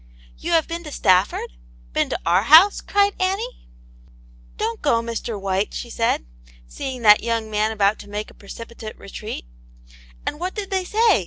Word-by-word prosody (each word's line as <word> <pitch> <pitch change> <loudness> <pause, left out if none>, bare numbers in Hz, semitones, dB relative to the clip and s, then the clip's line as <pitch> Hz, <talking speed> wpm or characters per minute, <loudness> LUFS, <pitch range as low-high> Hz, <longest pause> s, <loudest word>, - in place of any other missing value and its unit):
" - - -24
You 345 - -2
have 325 -2 +3
been 335 0 -5
to 300 - -7
Stafford.^ 185 - +1 0.3
Been - - +1
to - - -1
our 175 +3 +4
house 320 - +7
.^^ - - -25
cried 405 0 +3
Annie. 395 +7 -2 0.4
" - - -26
Don't 230 -1 -2
go, 260 -6 +3
Mr. 230 -2 -4
White," 195 +1 -1
she 240 - -6
said, 230 - 0 0.4
see 260 - -5
ing 245 - -9
that 210 -1 +7
young 230 -1 -2
man 215 +1 +1
about 210 -1 +2
to 205 - -11
make 210 +1 -5
a - - -17
precipitate 225 +2 -9
retreat 200 - -7 0.8
"And 295 - -3
what 365 +2 -3
did 410 -3 -5
they 380 -1 0
say. 435 - +3
230 Hz, 190 wpm, -22 LUFS, -, 0.8 s, house